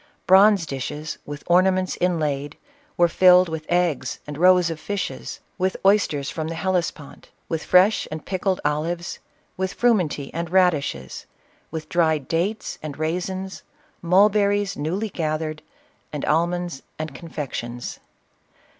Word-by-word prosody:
Bronze 195 -1 +6
dishes, 150 +2 -5
with 145 0 -7
ornaments 185 +1 +3
inlaid, 150 -5 -1 0.4
were 175 - +5
filled 180 +1 +6
with 160 -1 -5
eggs 170 -8 0
and 150 - -7
roes 180 +1 +4
of 160 - -6
fishes, 205 +3 -4 0.2
with 185 +1 0
oysters 195 -9 +3
from 160 0 -3
the 165 - -4
Helles 180 -1 0
pont, 145 -3 -14 0.2
with 165 -1 -3
fresh 185 +4 +4
and 155 -1 -7
pickled 190 0 -1
olives, 165 +4 -2 0.4
with 190 +1 -2
frumenty 180 - +1
and 170 0 -3
radishes, 155 - 0 0.4
with 155 -1 -6
dried 160 -5 +1
dates 185 +7 -2
and 150 -2 -6
raisins, 185 +4 -3 0.4
mulberries 200 +2 +3
new 155 +4 -2
ly 215 +2 -2
gathered, 155 -1 -2 0.5
and 150 - -4
almonds 170 -1 0 0.2
and 155 -2 -5
confections. 130 -5 -6
170 Hz, 130 wpm, -23 LUFS, 155-185 Hz, 0.5 s, Bronze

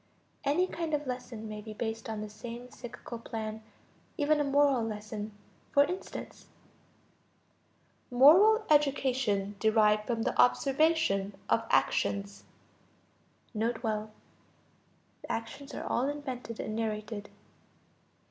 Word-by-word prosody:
Any 295 +6 +3
kind 330 -4 -2
of 295 0 -3
lesson 250 -3 -5
may 210 0 -6
be 215 0 -9
based 225 0 -4
on 220 -1 -3
the 215 - -4
same 240 +3 -8
psychical 240 -1 -8
plan, 220 -1 -5 0.6
even 300 0 +3
a - - +3
moral 280 -2 +3
lesson. 215 -1 -5 0.4
For 285 - +7
instance: 360 +6 -6 1.6
Moral 370 - +7
education 260 -9 +2
derived 215 -1 +3
from 230 -2 0
the - - -1
observation 270 -7 +2 0.2
of 230 - +3
actions. 200 0 +1 1.1
(N.B. 225 +2 0
The 215 -1 -1 1.2
actions 275 +5 -5
are - - -4
all 260 +4 0
invented 260 -5 -5
and 215 - -3
narrated.) 215 -1 -3
235 Hz, 110 wpm, -30 LUFS, 215-280 Hz, 1.6 s, For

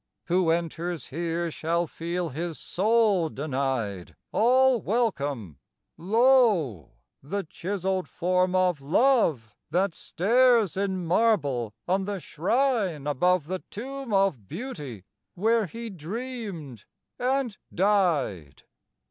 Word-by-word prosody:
Who 175 -1 +2
enters 170 -1 -2
here 170 +2 -2
shall 170 +3 -1
feel 170 +2 -3
his 160 +3 -4
soul 205 -4 +2
denied 130 - -3 0.2
All 255 +1 +4
welcome: 140 - -1 0.4
lo! 205 - +3 0.3
the 195 +9 -3
chiselled 190 +2 -3
form 180 +1 +1
of 180 -5 +2
Love, 155 - +2 0.2
That 180 +3 +1
stares 230 +4 +3
in 190 -2 -1
marble 145 - +1
on 190 +2 +1
the 200 -1 -3
shrine 190 - 0
above 165 +3 +2
The 185 +3 -3
tomb 270 +3 -6
of 195 - +1
Beauty, 150 - -7 0.3
where 220 +2 +2
he 230 +4 -7
dreamed 190 - -6 0.3
and 255 -3 0 0.2
died! 170 - +1
180 Hz, 105 wpm, -26 LUFS, 150-220 Hz, 0.4 s, All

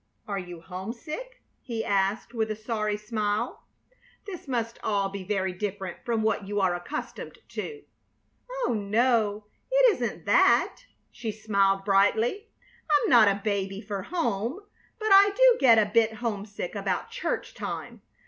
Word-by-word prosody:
"Are 200 -2 -2
you 175 -2 -8
homesick?" 235 - -7 0.2
he 230 -3 -4
asked, 200 +4 0
with 220 -2 -1
a 215 - -2
sorry 215 -1 -2
smile. 210 -1 -2 0.6
"This 365 -7 -8
must 230 -3 -2
all 200 -2 0
be 195 -1 -6
very 190 -1 -1
different 190 -1 -4
from 230 -2 0
what 215 -2 0
you 205 0 -1
are 190 -2 +2
accustomed 230 - -6
to." 435 -2 -6 0.8
"Oh - - +1
no, 215 0 +1 0.3
it - - +6
isn't - - -4
that." - - +4 0.3
She 230 -3 -4
smiled, 200 -2 +1
brightly. 220 - +2 0.4
"I'm 295 -1 +3
not 235 -4 +8
a 200 0 +1
baby 195 -2 -1
for 205 -2 -5
home, 245 - -2 0.4
but 435 -1 -2
I 395 +1 +7
do - - +6
get 240 -5 +6
a 210 -1 +2
bit 225 -1 +4
homesick 210 -5 -4
about 200 -2 -2
church - - -3
time. - - -6
215 Hz, 150 wpm, -27 LUFS, 200-240 Hz, 0.8 s, not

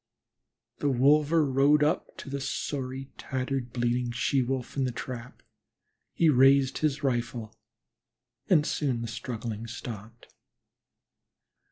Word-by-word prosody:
The 145 - +1
wolver 150 +5 +4
rode 140 +2 +4
up 150 - -1
to - - -8
the 140 0 -3
sorry, 135 -1 -4
tattered, 130 -1 -3
bleeding 120 0 0
She 130 +3 +1
wolf 130 0 -3
in 135 - 0
the 125 - -1
trap. 125 0 -7 0.7
He 165 - +3
raised 135 -1 +5
his 150 -2 0
rifle 120 -3 -2 0.9
and 155 -5 +5
soon 130 -8 -1
the - - -4
struggling 115 -1 -5
stopped. 115 -1 -9
130 Hz, 120 wpm, -28 LUFS, 120-140 Hz, 0.9 s, raised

